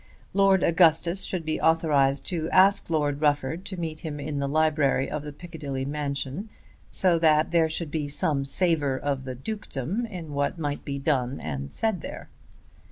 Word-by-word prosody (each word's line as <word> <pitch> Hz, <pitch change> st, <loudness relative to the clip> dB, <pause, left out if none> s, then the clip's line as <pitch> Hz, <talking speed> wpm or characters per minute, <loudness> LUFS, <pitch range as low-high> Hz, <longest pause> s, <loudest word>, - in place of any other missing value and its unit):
Lord 195 Hz, -1 st, +4 dB
Augustus 170 Hz, +2 st, +3 dB
should 175 Hz, -4 st, -3 dB
be 155 Hz, 0 st, -2 dB
authorised 150 Hz, -4 st, +3 dB
to 165 Hz, -3 st, -2 dB
ask 195 Hz, 0 st, +4 dB
Lord 145 Hz, -3 st, 0 dB
Rufford 150 Hz, +3 st, 0 dB
to 190 Hz, -, -5 dB
meet 160 Hz, -2 st, -4 dB
him 150 Hz, -3 st, -5 dB
in 145 Hz, 0 st, -3 dB
the 140 Hz, -, -1 dB
library 150 Hz, -2 st, +2 dB
of 150 Hz, -, -3 dB
the 150 Hz, 0 st, -7 dB
Piccadilly 145 Hz, -5 st, -6 dB
mansion, 145 Hz, +6 st, -3 dB, 0.4 s
so 175 Hz, -3 st, +3 dB
that 155 Hz, -1 st, +3 dB
there 165 Hz, -2 st, +3 dB
should 160 Hz, -1 st, -3 dB
be 150 Hz, -2 st, -2 dB
some 145 Hz, 0 st, 0 dB
savour 145 Hz, -2 st, +1 dB
of 135 Hz, -1 st, -2 dB
the 130 Hz, -1 st, -5 dB
dukedom 205 Hz, -, -4 dB
in 170 Hz, -8 st, -7 dB
what 140 Hz, +3 st, -1 dB
might 145 Hz, -3 st, -3 dB
be 140 Hz, -1 st, -4 dB
done 135 Hz, -2 st, 0 dB
and 70 Hz, -2 st, -5 dB
said 220 Hz, -7 st, -1 dB
there. -, -, -8 dB
155 Hz, 170 wpm, -26 LUFS, 140-170 Hz, 0.4 s, Lord